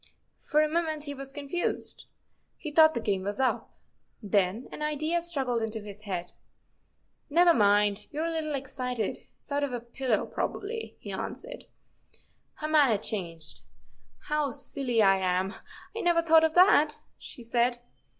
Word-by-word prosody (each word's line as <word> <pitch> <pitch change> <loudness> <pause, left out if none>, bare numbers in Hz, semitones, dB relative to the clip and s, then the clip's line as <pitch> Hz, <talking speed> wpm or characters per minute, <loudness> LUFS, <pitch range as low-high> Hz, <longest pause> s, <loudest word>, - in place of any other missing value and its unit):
" - - -46
For 305 +1 +4
a - - +2
moment 315 -1 -1
he 285 -1 -4
was 275 -1 -8
confused. 290 +5 -3 0.5
He 305 - -6
thought 315 +1 +6
the - - 0
game 200 -4 -1
was 205 +5 -4
up. 260 -1 0 0.4
Then 205 +2 0
an - - -8
idea 310 +3 0
struggled 270 -9 -1
into 225 0 -2
his 205 0 -10
head. 180 -4 -4 0.5
" - - -45
Never 350 -1 +7
mind; 205 -2 +3
you 300 - -6
're - - 0
a 335 - -1
little 310 -2 -2
excited. 255 -3 -3 0.2
It's - - -12
out 285 0 +1
of 280 -3 -2
a 245 - -2
pillow, 235 0 -1
probably," 450 +3 -4
he - - -7
answered. - - -6 0.9
Her 305 - -4
manner 290 -8 +4
changed. 175 -6 -5 0.3
" - - -35
How 300 -1 +1
silly 245 -2 -1
I 195 -1 +5
am; 185 +1 0 0.4
I 455 - -2
never 340 -1 +3
thought 325 -1 +6
of 320 0 +2
that," 330 -5 +5 0.2
she 240 - -9
said. 240 +1 +1
270 Hz, 170 wpm, -28 LUFS, 215-310 Hz, 0.9 s, Never